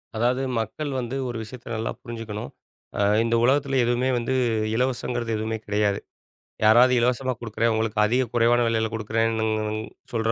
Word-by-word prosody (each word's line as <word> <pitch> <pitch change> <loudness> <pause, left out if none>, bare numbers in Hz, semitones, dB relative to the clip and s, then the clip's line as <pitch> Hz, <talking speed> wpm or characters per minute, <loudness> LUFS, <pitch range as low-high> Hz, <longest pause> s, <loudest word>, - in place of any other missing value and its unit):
அதாவது 120 +3 +1 0.2
மக்கள் 140 +7 -3
வந்து 125 +1 -4
ஒரு 120 - -4
விஷயத்த 120 +2 -11
நல்லா 110 +1 -2
புரிஞ்சுக்கணும். 115 - -6 0.5
அ - - +1 0.2
இந்த 115 0 +1
உலகத்தில 135 +1 +2
எதுவுமே 120 +2 +1
வந்து 120 +2 -1 0.4
இலவசங்கிறது 120 -1 -1
எதுவுமே 110 +1 -2
கெடையாது. 105 -1 +1 0.7
யாராவது 120 +4 +6
இலவசமா 125 +2 +1
குடுக்குறேன் 115 0 0
உங்களுக்கு 110 -1 -1
அதிக 125 +4 +2
குறைவான 120 +1 +4
விலையில 110 -1 +1
கொடுக்குறேன்னு 110 0 0 0.7
சொல்ற 115 -1 0
115 Hz, 140 wpm, -24 LUFS, 110-125 Hz, 0.7 s, யாராவது